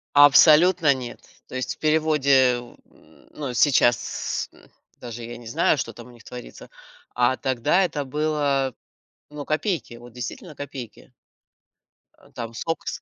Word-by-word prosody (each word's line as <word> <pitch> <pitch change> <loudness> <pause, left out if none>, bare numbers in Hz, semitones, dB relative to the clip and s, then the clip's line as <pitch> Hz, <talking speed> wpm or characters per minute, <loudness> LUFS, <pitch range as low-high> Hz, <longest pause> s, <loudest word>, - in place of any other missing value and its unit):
Абсолютно 150 +2 +7
нет. 125 -2 -7 0.3
То - - -10
есть 130 -1 -3
в - - -40
переводе 140 -5 +3
в 120 0 -13 0.2
м, - - -23
ну, 140 -5 -5
сейчас, 120 -3 +1
м, - - -21 0.3
даже 120 -1 -8
я 120 +1 -8
не 120 - -12
знаю, 155 +5 +2
что - - -3
там 120 0 -12
у - - -14
них 120 -1 -17
творится, 125 -1 -11 0.5
а 125 +1 +2
тогда 130 +10 +1
это 150 -6 -2
было, 140 -2 -1 0.5
ну, 150 -1 -8
копейки, 155 - -2
вот 120 +1 -13
действительно 150 - -7
копейки. 135 -6 -9 1.1
А - - -22
там 115 -1 -7
сок 165 +8 -4
из - - -5
135 Hz, 150 wpm, -23 LUFS, 120-155 Hz, 1.1 s, Абсолютно